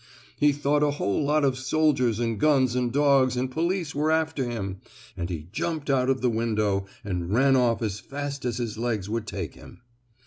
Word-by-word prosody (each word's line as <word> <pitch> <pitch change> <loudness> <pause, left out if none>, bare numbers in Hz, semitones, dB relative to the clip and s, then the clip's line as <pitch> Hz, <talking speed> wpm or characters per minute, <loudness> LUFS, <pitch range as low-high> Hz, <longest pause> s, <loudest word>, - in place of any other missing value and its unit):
He 145 0 +4
thought 145 +1 +1
a 150 - +3
whole 145 -4 -1
lot 150 +1 +2
of 130 -1 0
soldiers, 130 -5 +1
and 115 -3 -1
guns, 130 -4 +3
and 125 -1 0
dogs, 135 -2 +3
and 130 +1 -1
police 170 +1 -1
were 150 +2 0
after 160 -5 0
him, 100 -5 -4 0.4
and 85 -1 -4
he 80 -3 -5
jumped 155 +4 -2
out 130 -1 +2
of 135 -1 +1
the 125 - +2
window 105 -4 0 0.2
and 90 -3 -3
ran 135 +4 +4
off 120 -2 +2
as 105 -2 -2
fast 140 +1 -5
as 120 -2 -2
his 115 -3 -4
legs 110 -4 -2
would 115 -1 -2
take - - -5
him. - - -15
130 Hz, 200 wpm, -26 LUFS, 110-145 Hz, 0.4 s, He